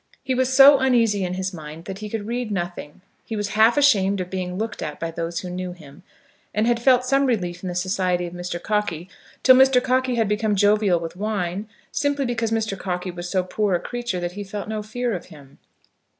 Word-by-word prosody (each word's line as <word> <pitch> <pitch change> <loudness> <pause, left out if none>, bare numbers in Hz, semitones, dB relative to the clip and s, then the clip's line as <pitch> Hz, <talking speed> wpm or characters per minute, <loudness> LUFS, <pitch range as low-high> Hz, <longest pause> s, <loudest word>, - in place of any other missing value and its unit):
He 260 - -1
was 260 0 +1
so 275 +1 +8
uneasy 230 -6 +2
in 180 0 -2
his 190 +1 -3
mind 155 0 -9
that 195 0 -6
he 215 0 -6
could 215 -1 -4
read 240 +1 -3
nothing. 175 -4 -5 0.2
He 225 - -5
was 205 -1 -2
half 220 +4 +4
ashamed 200 -9 +4
of 180 -1 -5
being 180 -1 -3
looked 220 0 -4
at 150 - -5
by 165 0 -3
those 165 +1 -4
who 180 - -6
knew 180 0 -4
him; 155 -2 -15 0.5
and 215 +1 +2
had 235 0 +1
felt 250 0 +4
some 275 +1 +2
relief 180 -8 -1
in 185 - -4
the 175 - -5
society 180 -1 0
of 170 - -7
Mr. 175 -1 -5
Cockey 190 -4 -2 0.3
till 260 - +8
Mr. 265 0 +6
Cockey 255 0 +1
had 225 -2 +1
become 210 0 0
jovial 205 -2 +3
with 165 0 -6
wine, 200 0 -3 0.2
simply 285 -1 0
because 235 -2 -1
Mr. 220 -2 -1
Cockey 180 -1 -4
was 175 0 -7
so 185 -1 +1
poor 195 +1 0
a - - 0
creature 240 -5 -4
that 175 0 -3
he 205 +3 -6
felt 200 +1 -6
no 215 0 -3
fear 240 +3 -3
of 180 - -6
him. 145 -5 -16
205 Hz, 220 wpm, -23 LUFS, 180-235 Hz, 0.5 s, so